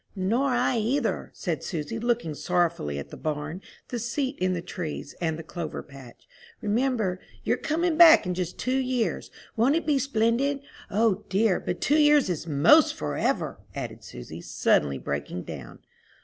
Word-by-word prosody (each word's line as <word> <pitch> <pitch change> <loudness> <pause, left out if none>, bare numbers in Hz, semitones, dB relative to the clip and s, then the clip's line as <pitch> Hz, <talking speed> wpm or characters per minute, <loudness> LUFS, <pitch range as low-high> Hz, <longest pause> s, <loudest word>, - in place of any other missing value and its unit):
"Nor 225 +9 +1
I 245 -1 +2
either," 235 +2 -1
said 165 -6 -3
Susy, 170 +7 -4
looking 235 -9 0
sorrowfully 170 - 0
at 70 - -7
the - - -8
barn, 155 +3 -4 0.3
the 240 - -3
seat 260 +4 -2
in 185 0 +1
the 175 - -2
trees, 165 -5 -5
and 160 -2 0
the 165 - -7
clover 165 -1 -5
patch. 135 -4 -14 0.3
"Remember, 215 -4 0 0.2
you're - - +2
coming 325 +1 0
back 335 -2 +9
in 180 - -1
just 180 -1 -4
two 255 +1 0
years. 255 -3 -1 0.3
Won't 245 +6 +3
it 335 - -1
be 290 -3 +2
splendid? 265 +2 +1 0.3
O 210 -1 +2
dear, 195 0 +2
but 175 - -4
two 300 +2 +3
years 295 -8 +5
is 170 -1 -4
'most 165 - +5
forever!" 75 -1 -1 0.2
added - - -6
Susy, 60 - -9
suddenly 70 -2 +1
breaking 70 +6 -4
down. 70 -7 -8
205 Hz, 165 wpm, -26 LUFS, 160-255 Hz, 0.3 s, back